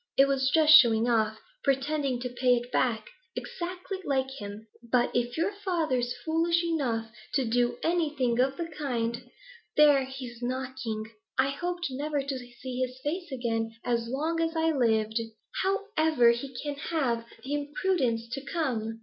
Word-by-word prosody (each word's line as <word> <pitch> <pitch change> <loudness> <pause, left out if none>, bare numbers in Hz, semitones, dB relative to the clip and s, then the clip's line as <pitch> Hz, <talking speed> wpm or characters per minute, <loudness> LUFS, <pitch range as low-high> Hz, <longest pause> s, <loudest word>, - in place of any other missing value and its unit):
It 275 - +7
was 270 -1 +2
just 310 +1 +6
showing 230 -2 +4
off, 220 -2 +2 0.3
pretending 275 -1 +1
to 250 - -2
pay 250 0 +3
it 240 +1 -4
back; 225 -4 0 0.2
exactly 365 +2 -5
like 265 -4 0
him! 205 +1 -7 0.2
But 240 +1 +1
if 240 +2 0
your 340 +5 +1
father's 315 -12 -1
foolish 335 +1 +2
enough 245 -9 -1 0.2
to 270 -3 +2
do 240 +1 +1
anything 295 -8 +1
of 265 +2 +2
the 340 - -2
kind 245 -7 -3 0.5
There, 290 -3 +6
he's 255 -3 -8
knocking. 250 -3 -3 0.3
I 260 +1 +3
hoped 350 +5 -3
never 290 +2 -1
to 275 -1 -3
see 250 +1 -7
his 255 0 -2
face 340 +2 -3
again 225 -3 -2
as 235 -1 0
long 310 +7 -1
as 330 0 0
I 325 0 +2
lived; 220 -5 +2 0.4
how 390 +1 +1
ever 310 -7 +5
he 245 +3 -4
can 290 -1 -2
have 255 -7 -1 0.2
the 275 +2 -3
impudence 290 -5 0
to 275 +3 -4
come! 230 -9 -2
260 Hz, 160 wpm, -28 LUFS, 240-310 Hz, 0.5 s, It